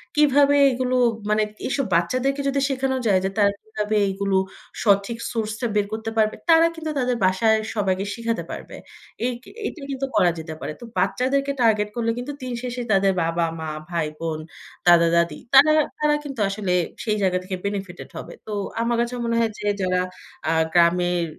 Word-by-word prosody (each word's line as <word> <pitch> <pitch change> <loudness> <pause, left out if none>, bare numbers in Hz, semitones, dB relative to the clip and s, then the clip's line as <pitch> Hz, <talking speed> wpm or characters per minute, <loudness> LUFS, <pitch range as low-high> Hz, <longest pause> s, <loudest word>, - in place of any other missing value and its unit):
কীভাবে 285 -1 +5 0.2
এগুলো 255 0 -1 0.3
মানে 215 0 +3 0.2
এসব 265 +1 0
বাচ্চাদেরকে 255 +11 +1
যদি 275 0 +1
শেখানো 265 -1 0
যায়, 195 -3 +4
যে 190 - +1
তারা 200 -1 +4
কিভাবে 215 0 -3
এগুলো 195 0 0 0.5
সঠিক 200 +2 +2
সোর্সটা 225 +1 -3
বের 205 -1 +3
করতে 220 0 -3
পারবে, 215 -1 +2
তারা 330 0 +7
কিন্তু 320 -1 -4
তাদের 250 -1 +1
বাসায় 220 +4 +3 0.2
সবাইকে 195 -2 0
শিখাতে 230 -1 -2
পারবে। - - -8 0.5
এক 245 -1 -3 0.3
এটা 315 - -8
কিন্তু 270 0 -2
করা 175 -1 +4
যেতে 160 0 -6
পারে। 150 - -4
তো - - -11
বাচ্চাদেরকে 265 +9 +1
টার্গেট 215 -3 +3
করলে 230 -1 0
কিন্তু 250 +4 -4
দিন 255 -1 -4
শেষে 245 0 -3
তাদের 195 -1 +4
বাবা-মা, 165 -1 -1 0.2
ভাই-বোন, 160 -1 -3 0.5
দাদা-দাদি 170 -2 +4
তারা, 290 +3 +8 0.3
তারা 300 0 +3
কিন্তু 275 -4 -7
আসলে 195 -2 -2 0.3
সেই 215 -2 0
জায়গা 185 -2 +2
থেকে 185 0 -4
বেনিফিটেড 195 -3 -4
হবে। - - -8
তো 215 - -4 0.3
আমার 235 0 +1
কাছে 240 +1 -2
মনে 230 0 0
হয় 230 -1 +1
যে 205 - -3
যারা 185 0 +1 0.5
আ - - +2 0.2
গ্রামের 175 0 +3
215 Hz, 165 wpm, -23 LUFS, 185-255 Hz, 0.5 s, তারা